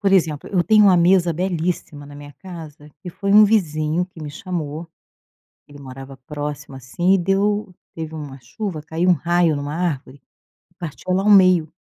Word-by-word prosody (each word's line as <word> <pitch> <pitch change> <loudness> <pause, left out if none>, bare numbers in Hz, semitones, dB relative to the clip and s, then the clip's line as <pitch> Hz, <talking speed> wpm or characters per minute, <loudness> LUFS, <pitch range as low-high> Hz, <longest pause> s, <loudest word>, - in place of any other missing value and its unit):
Por 195 -1 +1
exemplo, 160 -6 +1
eu 180 -3 +2
tenho 210 +4 +5
uma 185 -2 +6
mesa 175 0 +3
belíssima 170 -4 -3
na 145 - -12
minha 145 0 -11
casa, 160 -5 -11
que 180 - -8
foi 200 +3 -4
um 210 +1 +8
vizinho 165 -5 +1
que 175 -3 -15
me 150 - -6
chamou, 165 -1 -5 0.8
ele 145 0 -14
morava 135 0 -10
próximo, 145 -2 -6
assim 135 +9 0
e - - +4
deu 195 +2 0 0.2
teve 160 -1 -6
uma 145 -3 -8
chuva 160 - -6
caiu 165 +4 -1
um - - +7
raio 170 0 +1
em 145 - -3
uma 145 +1 -5
árvore, 145 -6 -3 0.6
partiu 175 +2 -5
ela 190 +1 +1
ao 210 - +2
meio 185 -5 +5
170 Hz, 180 wpm, -20 LUFS, 145-185 Hz, 0.8 s, um